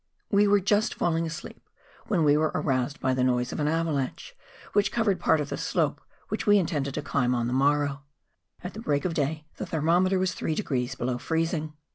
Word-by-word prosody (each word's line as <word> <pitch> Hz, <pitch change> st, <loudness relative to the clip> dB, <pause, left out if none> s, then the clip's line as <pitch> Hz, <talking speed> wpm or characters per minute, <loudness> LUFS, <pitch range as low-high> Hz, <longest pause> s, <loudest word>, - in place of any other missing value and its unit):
nitude. -, -, +1 dB
We 205 Hz, +1 st, +5 dB
were 205 Hz, 0 st, +5 dB
just 205 Hz, +3 st, +1 dB
falling 165 Hz, -1 st, 0 dB
asleep 160 Hz, 0 st, -9 dB, 0.4 s
when 185 Hz, -7 st, +2 dB
we 145 Hz, -1 st, +5 dB
were 155 Hz, +1 st, +2 dB
aroused 130 Hz, 0 st, 0 dB
by 130 Hz, 0 st, +1 dB
the 130 Hz, 0 st, +1 dB
noise 125 Hz, -1 st, +1 dB
of -, -, -4 dB
an 150 Hz, -, +1 dB
avalanche 155 Hz, -4 st, -2 dB, 0.4 s
which 205 Hz, 0 st, +2 dB
covered 215 Hz, -5 st, +1 dB
part 160 Hz, -, +3 dB
of 150 Hz, -1 st, -3 dB
the -, -, -3 dB
slope -, -, -1 dB, 0.3 s
which -, -, -3 dB
we 205 Hz, 0 st, +7 dB
intended 150 Hz, -7 st, -1 dB
to -, -, -3 dB
climb 125 Hz, -2 st, +1 dB
on 120 Hz, -1 st, 0 dB
the 120 Hz, -, -2 dB
morrow. 145 Hz, +1 st, +2 dB, 0.6 s
At 180 Hz, -, -5 dB
break 145 Hz, -7 st, 0 dB
of 180 Hz, -, 0 dB
day 155 Hz, +1 st, -1 dB
the -, -, -4 dB
thermometer 175 Hz, +4 st, +2 dB
was 185 Hz, -1 st, 0 dB
three 160 Hz, -, -2 dB
degrees 130 Hz, -9 st, -2 dB
below 125 Hz, -1 st, -2 dB
freezing. 160 Hz, 0 st, -1 dB
155 Hz, 205 wpm, -27 LUFS, 135-180 Hz, 0.6 s, we